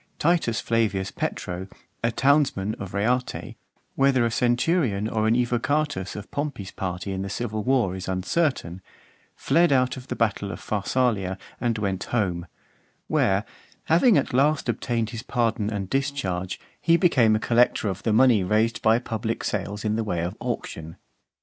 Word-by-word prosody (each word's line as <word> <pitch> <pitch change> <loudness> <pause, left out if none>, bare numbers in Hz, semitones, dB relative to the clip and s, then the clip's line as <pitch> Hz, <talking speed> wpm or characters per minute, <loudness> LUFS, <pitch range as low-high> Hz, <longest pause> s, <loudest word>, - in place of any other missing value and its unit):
Titus 160 -9 +1
Flavius 100 -4 0
Petro, 90 0 -4 0.4
a 115 - +2
townsman 130 -7 +2
of 95 0 -7
Reate, 125 +5 -1 0.4
whether 135 -3 +3
a 115 - 0
centurion 120 - +1
or 110 -1 0
an 110 - +3
evocatus 125 -2 0
of 105 -1 -8
Pompey's 140 -10 -4
party 95 +1 -4
in 95 0 -3
the 100 - -4
civil 110 +1 -3
war, 120 -6 +1
is 95 -1 -6
uncertain, 95 - -1 0.5
fled 170 -1 +3
out 130 -1 +2
of 130 0 -10
the - - -3
battle 100 -3 0
of - - -7
Pharsalia 105 -3 0 0.2
and 120 -2 0
went 100 -3 -2
home; 90 -7 -1 0.6
where, 100 +2 +1 0.4
having 175 - +4
at 140 - 0
last 140 +3 +2
obtained 115 -1 -1
his 115 -2 -5
pardon 115 -4 0
and 100 -3 -3
discharge, 95 -9 -2 0.2
he 170 0 +4
became 130 - +4
a - - +1
collector 120 -1 +2
of 95 -1 -3
the 115 - 0
money 115 -2 +5
raised 110 +5 +1
by 110 +1 +4
public 115 -1 -3
sales 105 +1 -3
in 105 0 +1
the 115 - 0
way 90 -6 -2
of 85 +2 -3
auction. 80 +1 -5
110 Hz, 160 wpm, -25 LUFS, 100-130 Hz, 0.6 s, money